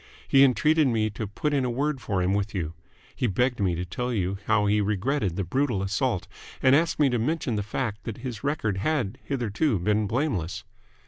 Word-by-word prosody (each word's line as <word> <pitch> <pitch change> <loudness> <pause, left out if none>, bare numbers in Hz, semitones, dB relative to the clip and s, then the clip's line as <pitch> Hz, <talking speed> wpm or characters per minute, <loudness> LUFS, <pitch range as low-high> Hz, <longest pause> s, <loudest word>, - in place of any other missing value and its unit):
He 135 0 +6
entreated 150 +4 +4
me 110 -3 +1
to 105 +1 -4
put 145 +9 -2
in 140 -2 +2
a 125 - 0
word 135 +2 -1
for 100 -5 -1
him 95 +2 +1
with 100 +1 -1
you. 80 -4 -2 0.4
He 125 - 0
begged 125 +5 +1
me 95 -4 +1
to 90 +2 -3
tell 125 +8 -3
you 95 -3 -1
how 105 -2 +3
he 105 +1 +3
regretted 105 - 0
the 100 - -1
brutal 115 +1 0
assault, 100 +1 -1 0.3
and 130 0 +5
asked 165 +2 +2
me 150 - +4
to 120 - +1
mention 140 -1 -1
the 105 - 0
fact 105 +1 -3
that 110 - -5
his 120 -3 -6
record 135 -9 -1
had 125 -1 -1
hitherto 125 -1 0
been 105 +4 +1
blameless." 115 - -1
110 Hz, 205 wpm, -26 LUFS, 100-135 Hz, 0.4 s, He